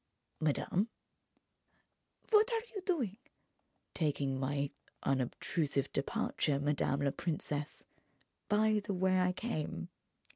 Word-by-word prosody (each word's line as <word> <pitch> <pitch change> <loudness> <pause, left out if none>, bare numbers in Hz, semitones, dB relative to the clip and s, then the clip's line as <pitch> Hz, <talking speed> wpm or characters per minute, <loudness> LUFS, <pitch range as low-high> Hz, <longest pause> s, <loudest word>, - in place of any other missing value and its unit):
"Madame?" 175 +7 +1 1.4
"What 435 +2 +6
are 455 -1 +1
you 400 - -3
doing?" 250 - +1 0.8
"Taking 140 -4 0
my 140 +1 0 0.3
unobtrusive 140 +2 0
departure, 140 +1 0
madame 145 -1 +1
la 140 -1 +2
princesse, 150 -2 -2 0.7
by 215 0 +4
the 200 - -2
way 185 0 +3
I 180 0 +3
came." 155 - -3
155 Hz, 100 wpm, -34 LUFS, 140-210 Hz, 1.4 s, What